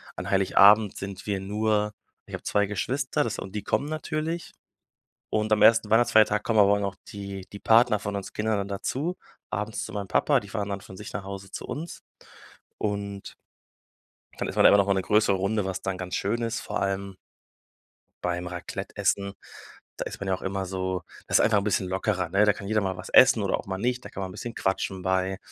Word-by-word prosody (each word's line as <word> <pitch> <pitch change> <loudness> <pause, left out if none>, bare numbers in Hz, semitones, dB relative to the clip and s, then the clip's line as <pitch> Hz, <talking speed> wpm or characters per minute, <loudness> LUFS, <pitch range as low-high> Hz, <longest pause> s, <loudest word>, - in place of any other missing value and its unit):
an - - -5
Heiligabend 100 +2 +5
sind 100 -1 -7
wir 100 -2 0
nur 105 +1 0 0.3
ich - - -13
habe - - -9
2 105 0 +2
Geschwister, 130 +6 -1
das 115 - -3
und 95 - -7
die 105 - -3
kommen 140 +7 0
natürlich. 155 +1 -3 0.8
Und 110 0 0
am 105 - +2
1. 115 -2 +6
Weihnachtsfeiertag 110 -2 +4
kommen 110 -2 +2
aber 100 0 +6
auch - - -1
noch 100 -1 -2
die 100 -2 -7
die 100 - -7
Partner 115 -1 +4
von 100 0 -4
uns 100 - -7
Kindern 110 0 0
dann 100 0 -2
dazu, 135 - -2 0.3
abends 105 +2 -3
zu 110 - -9
meinem 100 -2 -4
Papa, - - +3
die 100 - -12
fahren 105 -1 -3
dann 100 -1 -4
von 95 - -12
sich 105 - -9
nach - - -4
Hause 100 0 -8
zu - - -6
uns 160 +3 -6 0.8
und 100 -1 -4 1.1
dann - - -2
ist - - -6
man - - +4
immer - - +8
noch 100 - +3
mal 100 - +3
'ne 95 - 0
größere 105 +1 +3
Runde, 100 +2 0
was 95 -1 -4
dann 95 -1 -3
ganz 90 0 -5
schön 110 +4 -1
ist, 115 0 -2
vor - - -3
allem 100 0 -2 1.1
beim 90 0 -2
Raclette-Essen. 100 +2 -2 0.6
Da - - -3
ist - - -7
man 100 - -4
ja 95 - +2
auch - - -12
immer 95 0 -2
so 95 -1 -3 0.2
das - - +4
ist - - +5
einfach 105 -2 +4
'n - - -4
bisschen 100 -2 0
lockerer, 95 -2 -1
ne? 100 +4 +4
Da 105 - +4
kann 100 - -8
jeder 110 +1 +1
mal 95 -2 -2
was 90 - -8
essen 115 -4 +6
oder 100 - +1
auch - - -8
mal 95 -1 -3
nicht. 125 +4 -1
Dann - - -9
kann 100 - -6
man 95 - -3
'n - - -10
bisschen 120 +4 -6
quatschen 95 0 -1
bei. 95 0 0
100 Hz, 220 wpm, -26 LUFS, 95-110 Hz, 1.1 s, immer